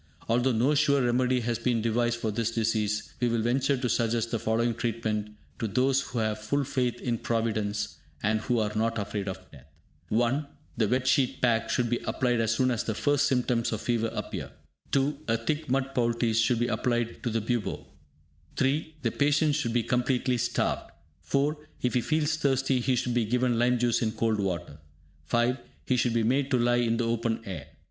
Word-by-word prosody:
Although 120 +3 +2
no 125 +6 +3
sure 140 -1 +3
remedy 125 +1 +2
has 120 0 -1
been 120 -1 +1
devised 120 +1 +1
for 110 -2 -1
this 115 +2 -1
disease, 110 -2 -1
we 125 - +2
will 115 -1 0
venture 135 +3 +1
to 125 0 -1
suggest 115 -1 0
the 115 - 0
following 115 +2 +1
treatment 110 -2 -2 0.2
to 115 - -1
those 130 +6 +2
who 130 -2 -6
have 110 -1 0
full 140 +7 0
faith 125 -3 -1
in 120 -2 -2
Providence, 105 -6 -1 0.3
and 110 +1 +1
who 120 +1 0
are 105 -2 0
not 115 +1 0
afraid 100 -1 -3
of 95 -1 -3
death. 70 -2 -15 0.4
(1) 120 +6 +1 0.3
The 110 - +2
"Wet 125 +4 +1
Sheet 130 -1 +2
Pack" 115 -2 +2
should 120 +1 +1
be 120 +1 0
applied 120 -2 +1
as 110 0 +1
soon 130 +2 +2
as 120 -1 -1
the 110 - -2
first 145 +4 +2
symptoms 125 -3 +1
of 110 - -2
fever 115 -2 0
appear. - - -5 0.4
(2) 140 +1 +1
A 115 0 +2
thick 150 +6 -2
mud 135 +1 0
poultice 115 -2 +1
should 115 +2 +3
be 120 - +1
applied 120 -1 -1
to 120 - -1
the 115 0 0
bubo. 115 0 -2 0.7
(3) 150 +4 0
The - - +1
patient 150 +1 +2
should 140 -5 -1
be 120 -1 +2
completely 125 0 +1
starved. - - -1 0.3
(4) 145 +2 +1 0.3
If 125 - +1
he 125 - +2
feels 155 +2 0
thirsty, 135 -3 +1
he 125 +1 +1
should 125 0 -1
be 120 -2 +2
given 125 +1 +1
lime 125 +1 +3
juice 120 -1 +1
in 110 -2 0
cold 110 -1 0
water. 85 -6 -3 0.5
(5) 120 - +1 0.3
He 130 - +2
should 120 -1 +1
be 115 - +2
made 135 +4 +1
to 130 - +3
lie 120 0 +3
in 115 -1 +1
the 120 - 0
open 115 -1 -1
air. 85 -7 -6
120 Hz, 200 wpm, -28 LUFS, 115-130 Hz, 0.7 s, no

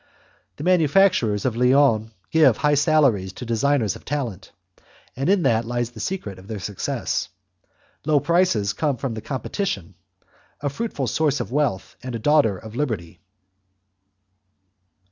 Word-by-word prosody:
The - - -8
manufacturers 175 - +3
of 125 -3 0
Lyons 125 -3 +3 0.2
give 150 -8 +5
high 150 +1 +2
salaries 140 - +3
to 125 - -8
designers 120 -1 +1
of - - -12
talent; 130 -9 -4 0.6
in 175 +8 +2
that 115 0 +2
lies 120 0 -2
the 115 - -12
secret 105 - -4
of 95 - -15
their 110 -1 -5
success. 100 0 -3 0.7
Low 150 -1 +3
prices 155 - +2
come 145 +3 -1
from 125 0 -3
competition 115 - -3 0.7
a 145 - -2
fruitful 145 - -3
source 145 +3 +1
of 100 - -4
wealth, 135 -9 -1
and 125 -2 -5
a - - -1
daughter 115 -5 +3
of 110 +3 -11
Liberty. 105 - -3
125 Hz, 135 wpm, -23 LUFS, 110-150 Hz, 0.7 s, give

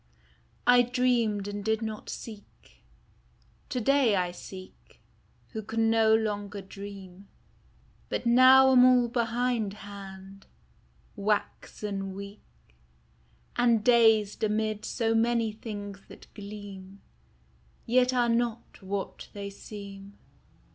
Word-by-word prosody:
T 245 0 +7
DREAMED 240 -5 +1
and 205 0 -5
did 220 +1 0
not 220 -1 -6
seek: 215 -3 -11 0.9
to 255 - -2
day 260 -2 +3
I 180 -2 0
seek 185 +1 -12 0.5
Who 220 - -5
can 225 +1 0
no 220 -1 +4
longer 205 -2 -2
dream; 195 -1 -10 0.8
But - - -3
now 260 +2 +7
am 250 -1 +7
all 250 -1 +5
behindhand, 205 -5 -3 0.7
waxen 200 -1 -3
weak, 200 +1 -9 1.1
And 235 -3 +3
dazed 225 -4 +4
amid 215 0 -1
so 225 -2 0
many 230 0 +2
things 205 -2 -7
that - - -15
gleam, 200 -2 -10 0.8
Yet 250 +2 +3
are 245 -2 +2
not 235 -1 -2
what 195 0 -5
they 200 -1 -6
seem. 200 -1 -10
215 Hz, 105 wpm, -28 LUFS, 200-235 Hz, 1.1 s, T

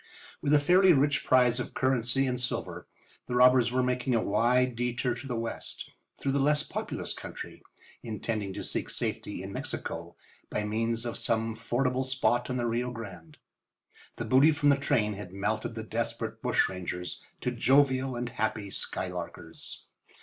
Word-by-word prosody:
With 145 - 0
a 150 - +7
fairly 180 +5 +6
rich 145 0 +2
prize 125 -1 +4
of 125 - -5
currency 130 0 +2
and 125 -1 -1
silver 125 - -3 0.4
the 125 - -2
robbers 125 -1 +6
were 130 0 +2
making 125 0 0
a 115 - +2
wide 120 +4 +2
detour 120 +1 0
to 130 +3 -8
the 125 - -2
west 115 0 -4 0.3
through 135 - -1
the 140 - +1
less 150 +2 +3
populous - - -3
country, - - -8 0.4
intending 110 -2 -3
to - - -5
seek - - -2
safety - - -3
in - - -7
Mexico - - -5 0.3
by 105 - -1
means 115 +2 -1
of 120 - -2
some 115 -1 0
fordable 125 +3 0
spot 120 -2 +1
on 125 - -1
the 120 - 0
Rio 120 +2 0
Grande. 95 -10 -9 0.8
The 120 - -4
booty 130 +7 +6
from 150 -1 +2
the 140 - +6
train 125 -7 +1
had 100 -2 -8
melted 105 +3 -2
the 110 - -4
desperate 115 0 -3
bushrangers 90 -7 -1 0.2
to 125 - 0
jovial 130 +1 +3
and 120 0 -3
happy 110 -3 -2
skylarkers. 90 -3 -4
120 Hz, 165 wpm, -29 LUFS, 110-130 Hz, 0.8 s, a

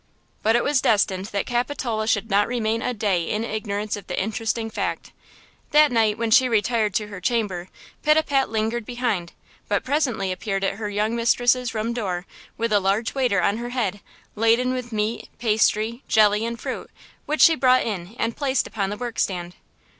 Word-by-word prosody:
But 225 +2 +3
it 240 - +2
was 285 -3 +2
destined 195 -3 +2
that 200 -2 -2
Capitola 240 -3 -1
should 220 -1 +1
not 205 -1 +2
remain 230 -2 -1
a 250 - -1
day 205 -6 0
in 215 +1 -1
ignorance 215 -2 -3
of 205 - -10
the 180 - -2
interesting 225 +2 -2
fact. - - -3 0.6
That 300 -1 +5
night, 220 -3 +2
when 230 0 -1
she 255 +3 +6
retired 220 -2 +1
to 210 -1 -1
her 200 -3 -8
chamber, 195 -4 -1 0.3
Pitapat 300 -3 +2
lingered 225 +1 -1
behind, 225 -7 -2 0.3
but 205 - 0
presently 250 -9 0
appeared 195 +1 -3
at 195 0 -1
her 215 -2 -4
young 210 +3 0
mistress's 245 +1 +2
room 220 +2 -1
door 185 -6 -3 0.3
with 230 -1 -1
a 205 - +5
large 200 +4 0
waiter 245 -9 +1
on 200 +4 +2
her 240 +1 -5
head, 220 -6 -2 0.4
laden 230 +4 +2
with 250 -1 -5
meat, 215 +1 -2
pastry, 220 +1 +1
jelly 215 +1 +4
and 235 0 -5
fruit, - - -5 0.4
which 305 +1 0
she 330 - +8
brought 255 -4 +4
in 200 -1 -5
and 230 0 -1
placed 270 -3 0
upon 200 -2 -2
the 205 - -4
work 240 -1 -5
stand. 175 -2 -1
220 Hz, 185 wpm, -23 LUFS, 205-240 Hz, 0.6 s, she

